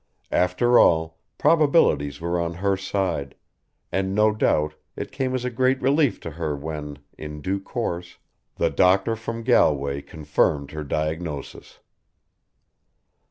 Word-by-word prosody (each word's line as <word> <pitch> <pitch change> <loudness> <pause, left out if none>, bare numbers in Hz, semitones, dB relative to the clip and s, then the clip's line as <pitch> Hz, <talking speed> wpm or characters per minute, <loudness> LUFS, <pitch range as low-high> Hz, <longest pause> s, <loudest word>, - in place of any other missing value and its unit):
After 90 +7 +3
all, 80 -1 +3 0.2
probabilities 140 - +3
were 85 +1 -1
on 85 0 -2
her 100 +2 +1
side, 95 -7 -2 0.6
and 95 0 -1
no 105 +1 +4
doubt 75 -7 +1 0.2
it - - -6
came 130 -1 -2
as 125 -1 -2
a 125 - -2
great 130 +2 +2
relief 140 0 +2
to 85 - -6
her 75 -1 -3
when, 75 0 -6 0.2
in 75 -1 -7
due 95 +7 -2
course, 90 -5 -4 0.4
the - - +1
doctor 95 +4 +3
from 115 +1 -6
Galway 70 - +2
confirmed 75 -2 -1
her 75 0 -5
diagnosis. 75 0 -4
90 Hz, 130 wpm, -24 LUFS, 75-115 Hz, 0.6 s, no